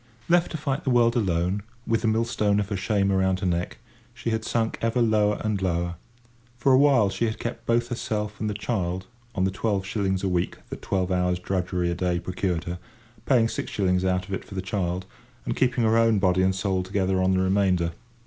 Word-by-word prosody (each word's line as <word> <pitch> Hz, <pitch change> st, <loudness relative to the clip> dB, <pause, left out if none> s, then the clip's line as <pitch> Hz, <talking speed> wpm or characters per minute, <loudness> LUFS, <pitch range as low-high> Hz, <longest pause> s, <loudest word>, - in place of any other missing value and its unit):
Left 175 Hz, 0 st, +3 dB
to 160 Hz, -, -4 dB
fight 140 Hz, +1 st, -2 dB
the -, -, -1 dB
world 120 Hz, -2 st, +4 dB
alone, 95 Hz, -2 st, 0 dB, 0.2 s
with 115 Hz, -1 st, +1 dB
the -, -, 0 dB
millstone 110 Hz, -2 st, +1 dB
of 100 Hz, -1 st, -2 dB
her 100 Hz, -, -1 dB
shame 100 Hz, 0 st, +1 dB
around 95 Hz, -1 st, +1 dB
her -, -, -1 dB
neck, 90 Hz, -1 st, -1 dB, 0.4 s
she 115 Hz, -, -3 dB
had 110 Hz, 0 st, -1 dB
sunk 115 Hz, 0 st, -1 dB
ever 115 Hz, +2 st, +1 dB
lower 105 Hz, -3 st, +2 dB
and 105 Hz, -3 st, -1 dB
lower. 85 Hz, -1 st, 0 dB, 0.6 s
For 135 Hz, +3 st, +2 dB
a 130 Hz, -, +7 dB
while 135 Hz, -9 st, +4 dB
she 95 Hz, +5 st, -1 dB
had 110 Hz, -1 st, -2 dB
kept 120 Hz, -, -6 dB
both 120 Hz, 0 st, +2 dB
herself 105 Hz, -3 st, -3 dB
and 110 Hz, -, -1 dB
the 105 Hz, -, -3 dB
child 95 Hz, -4 st, -2 dB, 0.3 s
on 95 Hz, -, +1 dB
the 95 Hz, -, +1 dB
twelve 100 Hz, 0 st, -1 dB
shillings 95 Hz, -2 st, -1 dB
a -, -, +1 dB
week 90 Hz, -1 st, -1 dB
that -, -, -6 dB
twelve 95 Hz, -1 st, -1 dB
hours' 90 Hz, -1 st, +1 dB
drudgery 90 Hz, -1 st, -1 dB
a -, -, 0 dB
day 90 Hz, 0 st, 0 dB
procured 90 Hz, -1 st, -2 dB
her, 85 Hz, 0 st, -5 dB, 0.5 s
paying 120 Hz, -4 st, +4 dB
six -, -, -4 dB
shillings 90 Hz, -2 st, +1 dB
out 95 Hz, 0 st, 0 dB
of 100 Hz, -, -6 dB
it 95 Hz, -, -3 dB
for 100 Hz, -, -11 dB
the 95 Hz, -, -1 dB
child, 95 Hz, -2 st, -2 dB, 0.4 s
and -, -, -2 dB
keeping 125 Hz, -2 st, +1 dB
her 110 Hz, 0 st, +3 dB
own 115 Hz, -2 st, +4 dB
body 95 Hz, -1 st, +2 dB
and 95 Hz, 0 st, +2 dB
soul 95 Hz, -1 st, 0 dB
together 95 Hz, 0 st, 0 dB
on 95 Hz, 0 st, +3 dB
the 95 Hz, -, +2 dB
remainder. 95 Hz, -3 st, +2 dB
95 Hz, 220 wpm, -25 LUFS, 90-110 Hz, 0.6 s, a